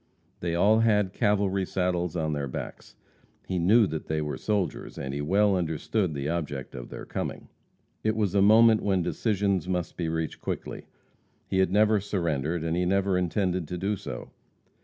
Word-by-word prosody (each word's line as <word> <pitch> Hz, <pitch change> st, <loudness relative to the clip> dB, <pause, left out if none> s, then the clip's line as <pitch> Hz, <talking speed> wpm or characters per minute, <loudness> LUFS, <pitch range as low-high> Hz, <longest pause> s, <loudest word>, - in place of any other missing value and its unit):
They 85 Hz, -1 st, -2 dB
all 105 Hz, +5 st, +4 dB
had 105 Hz, -4 st, +2 dB
cavalry 100 Hz, -3 st, +1 dB
saddles 90 Hz, -2 st, -1 dB
on 80 Hz, -2 st, -1 dB
their 70 Hz, -1 st, -2 dB
backs. 65 Hz, -, -7 dB, 0.5 s
He 90 Hz, -1 st, -2 dB
knew 105 Hz, +7 st, +5 dB
that 80 Hz, -3 st, -5 dB
they 80 Hz, 0 st, -1 dB
were 75 Hz, -1 st, -2 dB
soldiers, 105 Hz, -4 st, -2 dB
and 65 Hz, 0 st, -4 dB
he 70 Hz, -, -3 dB
well 100 Hz, +6 st, +3 dB
understood 85 Hz, +1 st, -1 dB
the 70 Hz, 0 st, -3 dB
object 75 Hz, -5 st, -3 dB
of -, -, -8 dB
their -, -, -8 dB
coming. -, -, -5 dB, 0.5 s
It 110 Hz, 0 st, +1 dB
was 105 Hz, -4 st, 0 dB
a 100 Hz, -, +3 dB
moment 110 Hz, +2 st, +6 dB
when 95 Hz, -3 st, +1 dB
decisions 100 Hz, -3 st, 0 dB
must 90 Hz, -3 st, -2 dB
be 85 Hz, -2 st, -1 dB
reached 80 Hz, -1 st, -3 dB
quickly. -, -, -5 dB, 0.6 s
He 95 Hz, -, -1 dB
had 95 Hz, -1 st, +3 dB
never 105 Hz, +1 st, +4 dB
surrendered, 85 Hz, -5 st, -1 dB
and 80 Hz, 0 st, -1 dB
he 90 Hz, -, +1 dB
never 95 Hz, +1 st, +1 dB
intended 90 Hz, -1 st, 0 dB
to 90 Hz, -, -4 dB
do 100 Hz, +4 st, -1 dB
so. -, -, -7 dB
90 Hz, 180 wpm, -27 LUFS, 80-100 Hz, 0.6 s, moment